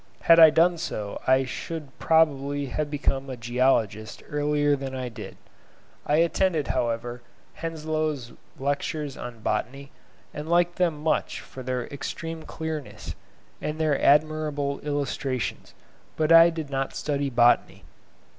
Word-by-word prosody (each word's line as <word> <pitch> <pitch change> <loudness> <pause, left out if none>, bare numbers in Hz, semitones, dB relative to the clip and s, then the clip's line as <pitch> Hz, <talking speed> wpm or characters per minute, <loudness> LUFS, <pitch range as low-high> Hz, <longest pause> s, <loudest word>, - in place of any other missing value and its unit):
Had 165 0 +6
I 160 -1 +10
done 170 +2 +3
so 105 -9 -4
I 130 +1 +4
should 150 +1 -6
probably 145 -3 +2
have 145 +3 -3
become 135 -2 -1
a 130 - -5
geologist 115 -3 0
earlier 145 0 +1
than 135 -1 -5
I 130 -1 -4
did. 115 -2 -9 0.7
I 150 - +3
attended, 165 -1 +1
however, 120 +1 -2 0.3
Henslow's 155 -5 -3 0.2
lectures 145 +1 -2
on 120 -2 -8
Botany, 135 +7 -3 0.4
and 150 +2 -6
liked 175 0 +2
them 170 -4 +1
much 160 - 0
for 130 - -10
their 125 -1 -2
extreme 165 +3 -5
clearness, 155 -3 -6 0.5
and 150 - -3
the 155 -3 +1
admirable 150 -1 +2
illustrations; 140 -3 -3 0.4
but 155 0 +1
I 165 +1 +9
did 160 -4 -6
not 135 0 -2
study 140 -1 -1
botany. 120 -1 +3
145 Hz, 130 wpm, -26 LUFS, 130-155 Hz, 0.7 s, I